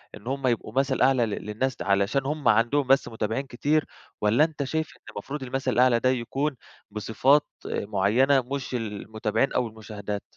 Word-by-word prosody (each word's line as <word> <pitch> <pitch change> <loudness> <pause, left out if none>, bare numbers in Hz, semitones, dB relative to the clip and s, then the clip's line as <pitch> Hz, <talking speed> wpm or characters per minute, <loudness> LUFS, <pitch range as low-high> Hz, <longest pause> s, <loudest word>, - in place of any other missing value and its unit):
إن 105 +3 -13
هُم 135 0 -1
يبقوا 115 -3 -1
مثل 135 +1 +1
أعلى 130 -3 +4
ل - - -4
للناس 105 +5 -2
د - - -6
علشان 100 +7 +1
هُم 150 +1 -2
عندهم 120 +5 +3
بس 135 +1 +4
متابعين 110 +4 -2
كتير، 145 +5 0 0.4
والّا 110 +8 +4
أنت 155 -3 -1
شايف 160 +3 -2
إن - - -38
المفروض 145 0 -6
المثل 130 +1 -2
الأعلى 125 -1 +4
ده 130 - +2
يكون 135 +4 -1 0.4
بصفات 110 +7 +2 0.2
معينة، 110 +7 +2
مش 130 0 -4
المتابعين 110 +2 -2
أو 125 - +1
المشاهدات؟ 105 -2 -6
125 Hz, 170 wpm, -26 LUFS, 110-135 Hz, 0.4 s, أعلى